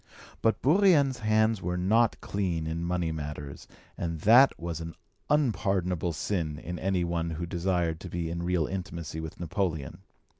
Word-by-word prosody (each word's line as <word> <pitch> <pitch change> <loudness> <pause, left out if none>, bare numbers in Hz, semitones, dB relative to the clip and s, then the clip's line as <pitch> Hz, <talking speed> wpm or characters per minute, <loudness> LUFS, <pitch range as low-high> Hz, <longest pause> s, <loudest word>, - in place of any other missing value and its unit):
But 110 -2 +1
Bourrienne's 150 -5 +4
hands 110 -1 +2
were 90 +1 -2
not 110 +6 +2
clean 90 -5 -2
in 80 +1 -3
money 85 -1 -1
matters, 75 -2 -6 0.3
and 85 -2 -4
that 120 +7 +7
was 85 -1 -4
an 80 -1 -7 0.3
unpardonable 95 - +1
sin 80 -3 -2
in 85 +1 -6
any 95 0 0
one 85 -1 -1
who 85 +1 -4
desired 85 -2 -1
to 90 - -8
be 85 -1 -3
in 85 0 -3
real 85 -2 +1
intimacy 85 -4 -5
with 80 -1 -7
Napoleon. 85 -5 -2
90 Hz, 155 wpm, -28 LUFS, 80-100 Hz, 0.3 s, that